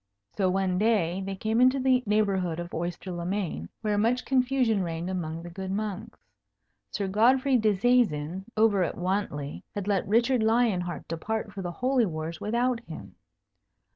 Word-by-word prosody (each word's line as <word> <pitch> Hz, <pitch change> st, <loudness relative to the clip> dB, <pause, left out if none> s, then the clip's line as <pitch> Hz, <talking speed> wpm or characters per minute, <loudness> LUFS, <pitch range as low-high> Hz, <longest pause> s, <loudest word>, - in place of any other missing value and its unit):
So, 190 Hz, -2 st, +2 dB
one 185 Hz, -1 st, 0 dB
day, 195 Hz, -5 st, +1 dB
they 195 Hz, 0 st, -4 dB
came 220 Hz, +5 st, 0 dB
into 255 Hz, +2 st, +5 dB
the 255 Hz, -1 st, +3 dB
neighbourhood 195 Hz, -5 st, +1 dB
of 175 Hz, 0 st, -6 dB
Oyster 175 Hz, +3 st, -4 dB
le 175 Hz, -1 st, -4 dB
Main, 175 Hz, -, -3 dB
where 210 Hz, -2 st, 0 dB
much 235 Hz, +4 st, +1 dB
confusion 255 Hz, -5 st, +2 dB
reigned 170 Hz, +1 st, -3 dB
among 165 Hz, -3 st, -4 dB
the 175 Hz, -, -7 dB
good 190 Hz, +2 st, -6 dB
monks. 205 Hz, -1 st, -4 dB, 0.7 s
Sir 200 Hz, -2 st, -2 dB
Godfrey 255 Hz, +7 st, +3 dB
Disseisin 200 Hz, -6 st, +2 dB
over 215 Hz, -3 st, +4 dB
at -, -, -3 dB
Wantley 175 Hz, -6 st, -2 dB
had 205 Hz, -1 st, -3 dB
let 200 Hz, -3 st, +1 dB
Richard 235 Hz, +4 st, +3 dB
Lion 220 Hz, -3 st, +2 dB
Heart 175 Hz, -1 st, -6 dB
depart 210 Hz, +6 st, -3 dB
for 200 Hz, -, -5 dB
the 175 Hz, -, -3 dB
Holy 250 Hz, +1 st, +1 dB
Wars 160 Hz, 0 st, -5 dB
without 235 Hz, +3 st, 0 dB
him. 160 Hz, -, -9 dB
200 Hz, 165 wpm, -27 LUFS, 175-230 Hz, 0.7 s, into